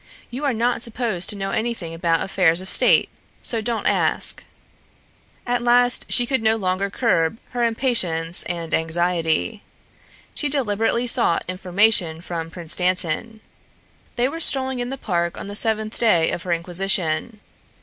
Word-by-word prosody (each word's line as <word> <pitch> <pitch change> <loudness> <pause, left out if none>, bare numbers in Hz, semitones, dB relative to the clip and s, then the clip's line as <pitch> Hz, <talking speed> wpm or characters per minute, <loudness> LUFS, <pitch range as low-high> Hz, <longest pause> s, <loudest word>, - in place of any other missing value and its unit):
"You 265 +5 -4
are 280 - +2
not 235 +2 -1
supposed 230 -6 -1
to - - 0
know 195 -1 -4
anything 220 -8 -3
about 165 -1 0
affairs 180 -3 +2
of 185 - -8
state. - - +5 0.4
So 230 -2 +2
don't 230 +1 -3
ask." - - +1 1.0
At 245 0 -1
last 245 +1 +3
she 245 - +3
no 220 0 +2
longer 195 -1 -2
could - - -15
curb 165 -6 +1
her 245 -1 -2
impatience 185 -9 +1
and 170 -2 -5
anxiety. 170 +4 0 0.7
She 295 - -2
deliberately 235 -3 0
sought 235 -8 +2
information 185 -2 +1
from 165 -1 -6
Prince 165 -1 -4
Dantan. 185 +4 -1 0.7
They 245 +1 +1
were 325 +5 -6
strolling 265 -4 +3
in 245 0 -3
the 270 - -5
park 170 -7 -2
on - - -7
the 205 - -7
seventh 220 0 0
day 180 -9 +3
of - - -4
her 180 - -5
inquisition. 175 +3 0
200 Hz, 150 wpm, -21 LUFS, 170-235 Hz, 1.0 s, state